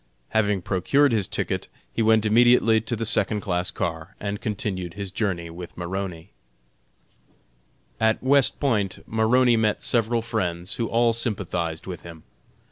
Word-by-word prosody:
Having 105 -4 +1
procured 135 +12 +2
his 105 -5 +1
ticket, - - -2 0.3
he - - -1
went 110 -1 +4
immediately 115 0 +5
to 120 +2 -3
the 115 +1 -3
second 105 -1 +1
class 90 -2 0
car 85 0 -4
and 100 0 -4
continued 95 -5 -3
his 100 -2 -5
journey 90 -5 -2
with 85 +1 -10
Maroney. 90 0 -5 1.7
At 110 +1 +1
West 135 0 +3
Point 105 -9 0
Maroney 115 +2 +3
met 110 -1 0
several 115 0 +1
friends, 90 -5 -2
who 115 - -1
all 115 +1 +2
sympathized 90 -8 -2
with 90 -3 -7
him. 85 -2 -11
105 Hz, 140 wpm, -24 LUFS, 90-115 Hz, 1.7 s, immediately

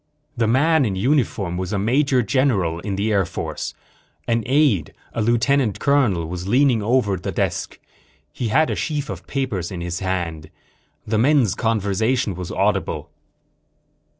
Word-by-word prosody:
The 115 -2 +1
man 145 +6 +3
in 105 -6 -1
uniform 105 - 0
was 95 0 -3
a 105 - 0
major 125 +5 +2
general 105 -10 +1
in 100 +2 -4
the 105 +3 0
Air 100 -2 +3
Force. 85 - -5 0.5
An 115 0 +1
aide, 130 - +2 0.2
a - - -1
lieutenant 120 +1 +2
colonel, 125 - +2
was 90 +2 -5
leaning 125 0 +3
over 105 -3 +1
the 90 - -4
desk. - - -2 0.5
He 120 - -3
had 155 +8 +2
a - - -1
sheaf 150 -2 -2
of - - -8
papers 110 - -2
in 90 -2 -5
his 85 +1 -3
hand. 85 -5 -3 0.6
The 110 0 0
men's 130 - +3
conversation 110 0 0
was 90 0 -6
audible. - - -1
110 Hz, 150 wpm, -21 LUFS, 95-130 Hz, 0.6 s, man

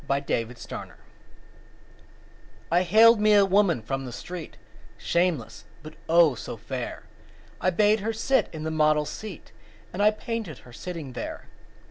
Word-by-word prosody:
My 140 0 +2
Madonna 120 -4 -5 1.8
I 175 +1 +4
haled 220 +5 +6
me 215 0 +5
a 200 -1 +6
woman 190 - +2
from 135 +4 -3
the 125 - -7
street, 170 +7 -8 0.4
Shameless, 115 - -1 0.2
but, 155 0 -10 0.2
oh, 165 -3 +6
so 120 -1 -7
fair! 120 +3 -6 0.6
I 185 - +3
bade 210 +4 +3
her 215 +3 -2
sit 265 +4 +1
in 155 -2 -7
the 160 - -2
model's 150 -1 +2
seat 200 +1 -9 0.4
And 185 - -2
I 210 - +6
painted 215 - -5
her 125 - -14
sitting 160 -4 -7
there. - - -6
165 Hz, 145 wpm, -26 LUFS, 135-205 Hz, 1.8 s, haled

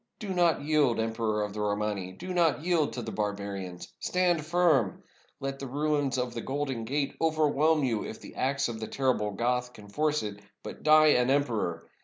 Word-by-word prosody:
Do 210 - -7
not 175 -4 +2
yield, 145 -6 +2
Emperor 110 -1 0
of 105 -1 -4
the 105 - -4
Romani 105 -2 -1
— - - -23
do 185 - -5
not 165 -4 +2
yield 170 -4 +1
to 120 - -4
the 110 - -5
barba 105 -2 -2
rians. 95 -3 -6
Stand 175 -3 +1
firm. 155 - +2 0.4
Let 135 0 -4
the 135 - -5
ruins 145 0 0
of 125 -1 -2
the 115 - -4
Golden 135 -4 -3
Gate 140 +4 -1
overwhelm 155 -1 +3
you 115 -5 0
if 110 - -7
the - - -11
axe 140 +1 0
of 115 -2 -5
the 110 - -4
terrible 130 -6 0
Goth 125 +4 -1
can 105 -3 -13
force 150 +5 0
it; 105 -1 -5 0.2
but - - -8
die 155 0 +6
an 125 -3 +3
emperor! 115 -12 0
130 Hz, 200 wpm, -29 LUFS, 110-150 Hz, 0.4 s, die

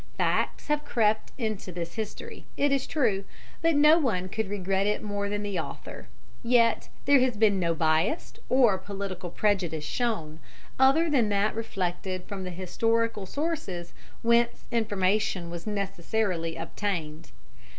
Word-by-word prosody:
Facts - - 0
have 300 0 0
crept 215 -6 +1
into 215 -6 -3
this 170 -1 -5
history, 220 -2 -6
it 285 0 +2
is 275 -1 +1
true, 220 -10 +1 0.4
but 330 -1 +3
no 300 +3 +7
one 185 - 0
could 220 0 -2
regret 195 0 0
it 210 - 0
more 205 -1 -2
than 205 0 -2
the 200 -4 -2
author; - - -7 0.3
yet 235 -1 +3 0.2
there 280 -1 +6
has 250 -3 +1
been 205 -3 +4
no 170 -2 +1
bias 155 - +1 0.2
or 240 -7 +4
political 190 -2 -5
prejudice 175 -6 0
shown, 160 -6 -2 0.4
other 275 +6 +5
than 255 -9 +2
that 205 +1 +2
reflected 185 -4 -3
from 195 -1 -6
the - - -4
historical 210 +4 0
sources 200 - -3 0.3
whence 235 0 +2
information 205 -5 0
was 170 +3 -7
necessarily 195 -3 -1
obtained. 165 -2 -4
205 Hz, 140 wpm, -27 LUFS, 180-230 Hz, 0.4 s, no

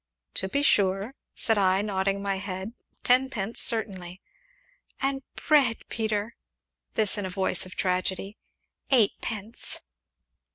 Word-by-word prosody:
"To 190 - -1
be 280 +7 +1
sure," 200 0 +3 0.2
said 225 -2 +2
I, 190 0 +3
nodding 195 -1 0
my 195 -1 0
head, 190 +2 -5 0.3
"tenpence, 245 -4 +2
certainly." 190 -5 -1 0.8
"And 270 0 0 0.3
bread, 280 -6 +4
Peter" 220 0 -1 0.6
(this 215 -1 +2
in 200 - -2
a - - -5
voice 185 -1 -1
of 185 - -10
tragedy) 190 +2 0 0.3
" - - -57
eightpence." 220 -2 0
200 Hz, 120 wpm, -27 LUFS, 190-230 Hz, 0.8 s, bread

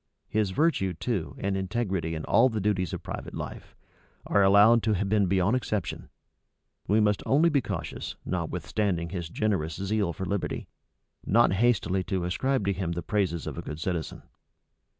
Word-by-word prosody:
His 105 -2 +1
virtue, 95 - +1
too, 95 -1 -3
and 100 0 -1
integrity 95 -4 -2
in 80 - -5
all 130 - +5
the 110 -3 -2
duties 95 -4 0
of - - -5
private - - -6
life, - - -7 0.5
are 100 - +3
allowed 100 +4 +6
to 110 - +1
have 100 0 0
been 105 -2 +3
beyond 95 +5 +2
exception: 105 -7 -3 0.8
we 105 +3 +3
must 105 -1 +2
only 155 +5 +4
be 145 -4 +2
cautious, - - -5
notwithstanding 85 +1 -2
his 85 -3 -5
generous 85 -6 -1
zeal 100 -1 0
for 95 +4 -5
liberty, 100 0 -3 0.6
not 115 -1 +4
hastily 95 -3 +2
to 95 -3 -1
ascribe 130 +6 0
to 100 - +2
him 90 -2 -2
the 85 0 -4
praises 95 -5 -1
of - - -5
a - - -3
good 75 - -7
citizen. 85 -1 -3
95 Hz, 170 wpm, -27 LUFS, 90-110 Hz, 0.8 s, allowed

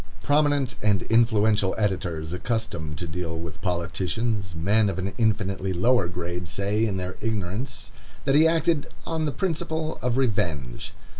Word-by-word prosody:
Prominent 145 -3 +2
and 105 -3 +2
influential 110 -4 +3
editors, 85 -6 -1
accustomed 90 -7 -2
to 85 - -3
deal 80 0 -3
with 80 -1 -7
politicians, 95 +3 -1
men 100 +6 +3
of 95 - -3
an 95 +1 -2
infinitely 100 -4 +1
lower 115 +3 +3
grade, 90 0 -4
say, 105 +3 +1
in 100 -3 -1
their 95 0 -4
ignorance, 110 +4 -3 0.3
that 135 - +3
he 155 +3 +7
acted 165 -2 +2 0.2
"on 160 -1 -1
the 150 - 0
principle 160 -2 -2
of 125 0 0
revenge." 85 - -1
105 Hz, 145 wpm, -26 LUFS, 90-125 Hz, 0.3 s, he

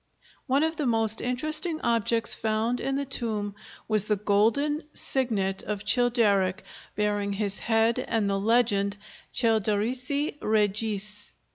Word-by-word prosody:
One 275 +3 +2
of 320 0 -1
the 295 - -1
most 225 -2 +2
interesting 310 +6 0
objects 230 0 +1
found 220 +3 -1
in 270 - -2
the 280 0 -2
tomb 215 -6 -2 0.3
was 215 -2 +2
the 210 - +1
golden 220 +10 +1
signet 205 -8 -1
of 210 0 -5
Childeric 210 -5 +2 0.3
bearing 205 -1 -1
his 200 0 -1
head 225 0 +1
and 225 -3 0
the 195 0 0
legend 205 -2 +2 0.3
Childerici 245 +6 0
regis. 210 -1 -1
220 Hz, 125 wpm, -26 LUFS, 205-245 Hz, 0.3 s, One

